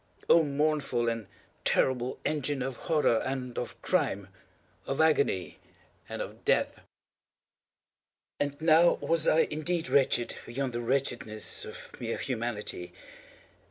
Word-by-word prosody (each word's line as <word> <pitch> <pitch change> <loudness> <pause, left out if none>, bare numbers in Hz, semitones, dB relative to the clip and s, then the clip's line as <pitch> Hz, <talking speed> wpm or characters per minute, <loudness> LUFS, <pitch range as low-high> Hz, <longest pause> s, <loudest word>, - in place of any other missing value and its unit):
—oh, 170 - +7
mournful 145 -4 0
and 115 -3 -2 0.4
terrible 125 -1 +1
engine 145 -3 0
of 135 0 -3
Horror 150 -6 +2
and 130 -2 -3
of 120 - -6
Crime—of 115 - -3
Agony 145 - +2 0.5
and - - -3
of - - -11
Death! - - +1 1.6
And 145 0 -1
now 165 +2 +6
was 165 -1 0
I 160 - +5
indeed 165 +2 -1
wretched 130 -3 +3
beyond 125 +1 -2
the 120 - -2
wretchedness 120 -4 -1
of - - -9
mere 115 -1 -2
Humanity. 115 -7 -3
135 Hz, 115 wpm, -29 LUFS, 120-155 Hz, 1.6 s, oh